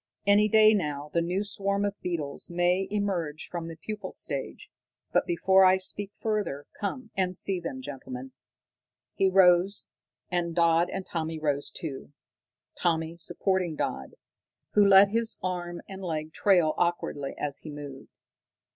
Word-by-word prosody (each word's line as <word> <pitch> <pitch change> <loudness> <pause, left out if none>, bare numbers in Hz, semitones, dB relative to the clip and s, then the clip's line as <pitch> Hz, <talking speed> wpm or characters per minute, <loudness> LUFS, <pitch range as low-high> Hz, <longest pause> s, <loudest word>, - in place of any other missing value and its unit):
Any 205 +1 +5
day 215 0 +6
now 150 -6 -2
the 170 - +2
new 180 +4 -1
swarm 200 0 0
of 200 - -1
beetles 160 -6 -4
may 175 +2 +1
emerge 185 -7 -2
from 170 -2 -5
the 165 - -7
pupal 205 +4 -6
stage. 140 -4 -5 0.4
But - - +2
before 190 +3 +4
I 185 0 +6
speak 195 +1 -1
further, 210 -10 -2
come 225 +3 -4
and 185 -1 0
see 195 -2 +1
them, 260 +10 -6
gentlemen!" 260 0 -7 0.8
He 195 - +2
rose, 185 +1 +4 0.5
and 170 -2 -1
Dodd 170 0 +3
and 190 - -4
Tommy 160 -1 -3
rose 145 -2 -1
too, 145 -2 -7 0.6
Tommy 165 -1 0
supporting 180 0 -1
Dodd, 65 - -4 0.6
who 210 - +6
let 195 0 +8
his 230 +1 +1
arm 175 -1 -3
and 195 0 -8
leg 160 -3 -4
trail 175 -6 +3
awkwardly 170 -5 -1
as 145 -2 -3
he 155 - -9
moved. 145 -2 -9
180 Hz, 145 wpm, -28 LUFS, 160-200 Hz, 0.8 s, let